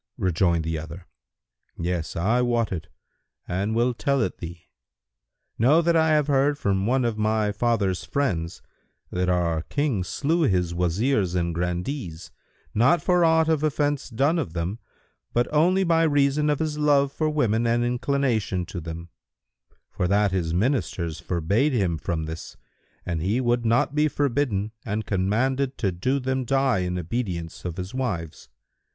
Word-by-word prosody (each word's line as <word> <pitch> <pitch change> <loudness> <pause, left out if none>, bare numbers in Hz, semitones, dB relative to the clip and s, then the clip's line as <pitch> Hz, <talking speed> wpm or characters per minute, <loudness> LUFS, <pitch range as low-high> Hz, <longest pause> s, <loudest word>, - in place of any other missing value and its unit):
Rejoined 85 -2 +1
the 80 0 -2
other, 85 +3 -9 0.7
"Yes, 85 -4 -3
I 110 +9 +2
wot 120 -3 +1
it 85 -4 -4 0.6
and 100 +5 -1
will 120 +2 +2
tell 140 +3 0
it 95 - -4
thee. 85 0 -8 0.9
Know 145 +9 +5
that 170 0 +2
I 160 -1 +4
have 150 -2 +3
heard 140 0 +2
from 100 -7 0
one 130 +1 +2
of 110 -2 -1
my 110 -1 +1
father's 105 -4 0
friends 90 -13 -2 0.5
that 90 0 0
our 85 -3 +1
King 135 - -1
slew 155 - 0
his 90 - +1
Wazirs 90 +3 +1
and 85 -1 0
Grandees, 90 - -4 0.4
not 125 +10 +4
for 180 -1 +3
aught 160 -1 +4
of 160 -2 +2
offence 145 -2 0
done 140 +8 +1
of 85 - -4
them, 90 +6 -3 0.5
but 120 0 +2
only 180 +5 +4
by 165 -2 +3
reason 145 -1 +2
of 150 - +2
his 150 -1 -2
love 140 -2 +3
for 155 +2 -1
women 120 -6 +1
and 120 +1 +2
inclination 120 -7 0
to 90 -1 -6
them; 85 +1 -7 0.8
for 90 - -1
that 100 +1 +2
his 90 -4 -1
Ministers 90 - -1
forbade 100 - 0
him 90 -9 0
from 80 +1 -2
this, 80 +1 -7 0.5
but 85 -2 -2
he 100 +9 0
would 120 -2 +1
not 120 +4 +2
be 150 +1 +3
forbidden 130 -8 0
and 110 0 -3
commanded 130 +8 0
to 100 -5 0
do 125 +11 0
them 130 0 -1
die 135 -2 +2
in 90 0 -2
obedience 90 -3 -4
to 90 - -4
his 95 +3 -5
wives. 100 -12 -4
110 Hz, 160 wpm, -25 LUFS, 90-140 Hz, 0.9 s, Know